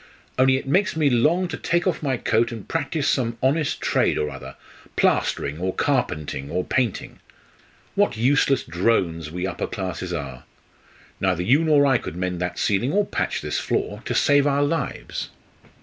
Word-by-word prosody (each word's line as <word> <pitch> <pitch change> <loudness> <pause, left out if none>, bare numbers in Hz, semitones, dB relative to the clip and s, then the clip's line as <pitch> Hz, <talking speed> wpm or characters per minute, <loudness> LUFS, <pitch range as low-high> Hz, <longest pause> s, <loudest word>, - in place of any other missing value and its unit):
"Only 130 0 +5
it 135 - -6
makes 180 +4 +2
me 150 -3 +2
long 160 +10 +3
to - - -4
take 175 +1 0
off 180 -4 0
my 135 -4 0
coat 115 +1 +1
and 115 -4 -8
practise 155 -2 -1
some 120 -3 0
honest 145 +3 +1
trade - - +1
or 75 - -1
other 65 0 -9 0.4
plastering, 75 +3 +1
or 95 +1 -2
carpentering, 70 -2 -1
or 90 +1 -1
painting. 120 -2 -2 0.7
What 200 - +1
useless 135 +3 +2
drones 85 -5 0
we 90 +3 -4
upper 95 - -3
classes 90 -2 -4
are! 70 -7 -5 0.7
Neither 90 -2 +1
you 135 - +4
nor 150 -3 +4
I 135 -4 +3
could - - -7
mend 90 -1 -3
that 90 -1 -3
ceiling 105 +6 +1
or 205 +1 +3
patch - - -2
this - - -2
floor - - -2
to - - -2
save 145 0 +4
our 140 0 +2
lives." 160 +3 -3
120 Hz, 170 wpm, -23 LUFS, 90-145 Hz, 0.7 s, Only